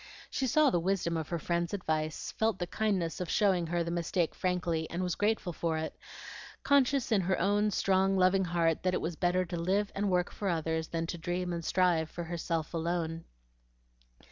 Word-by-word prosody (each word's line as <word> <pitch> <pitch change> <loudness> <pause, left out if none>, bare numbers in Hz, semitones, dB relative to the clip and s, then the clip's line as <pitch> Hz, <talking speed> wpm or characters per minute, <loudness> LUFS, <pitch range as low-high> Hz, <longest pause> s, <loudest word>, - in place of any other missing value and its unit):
She 265 - 0
saw 300 +3 +4
the 175 - +2
wisdom 170 -1 0
of 160 -2 -3
her 170 - -1
friend's 170 +3 -1
advice, 155 -4 -2
felt 220 -2 0
the 175 - -2
kindness 185 -4 -1
of 180 - -3
showing 190 -6 +2
her 170 +1 0
the 170 - -4
mistake 170 0 0
frankly, 175 -3 -1
and 175 +2 -2
was 180 -1 0
grateful 205 -3 0
for 160 0 -1
it, 160 0 -4 0.7
conscious 275 -2 +3
in 210 -3 +4
her 185 +1 0
own 205 +3 +2
strong, 195 -1 +2
loving 185 +1 +4
heart 165 -2 +1
that 185 0 +1
it - - -1
was 165 0 -3
better 180 +2 +1
to 175 - -5
live 195 +4 0
and 200 0 -1
work 180 -1 +1
for 200 - -3
others 160 -1 -1
than 165 0 -2
to 170 +1 -5
dream 175 +1 -2
and 170 -1 -4
strive 170 -3 +2
for 170 - -6
herself 165 -1 -3
alone. 165 0 -2
175 Hz, 195 wpm, -31 LUFS, 165-190 Hz, 0.7 s, saw